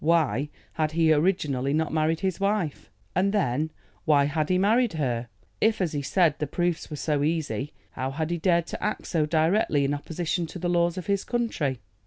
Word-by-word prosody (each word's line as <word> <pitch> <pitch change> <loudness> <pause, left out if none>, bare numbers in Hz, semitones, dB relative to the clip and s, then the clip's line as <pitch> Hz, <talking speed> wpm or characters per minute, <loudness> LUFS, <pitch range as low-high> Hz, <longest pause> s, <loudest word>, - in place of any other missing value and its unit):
Why 155 -3 +2 0.2
had 155 -1 -1
he 165 -1 +4
originally 145 -5 +1
not 160 0 0
married 160 +2 +1
his 190 -3 -1
wife? 195 -6 -1 0.3
And 190 +3 +2
then, 155 - +1 0.3
why 145 -3 +4
had 150 +1 -1
he 185 - +3
married 220 +4 +3
her? 125 -6 -1 0.3
If, 220 0 +3
as 180 -5 0
he 145 - -1
said, 150 +2 +2
the 150 - -1
proofs 175 +3 -1
were 150 - -5
so 150 0 0
easy, 150 -2 -1 0.2
how 130 +1 -3
had 155 +4 -3
he 170 - -1
dared 170 0 +2
to - - -7
act 210 - -2
so 155 -4 0
directly 160 -2 +2
in 140 - 0
opposition 165 +3 -2
to 170 - -8
the 175 0 -2
laws 175 0 +2
of 185 - -4
his 200 -1 0
country? 160 - -1
160 Hz, 200 wpm, -26 LUFS, 150-180 Hz, 0.3 s, he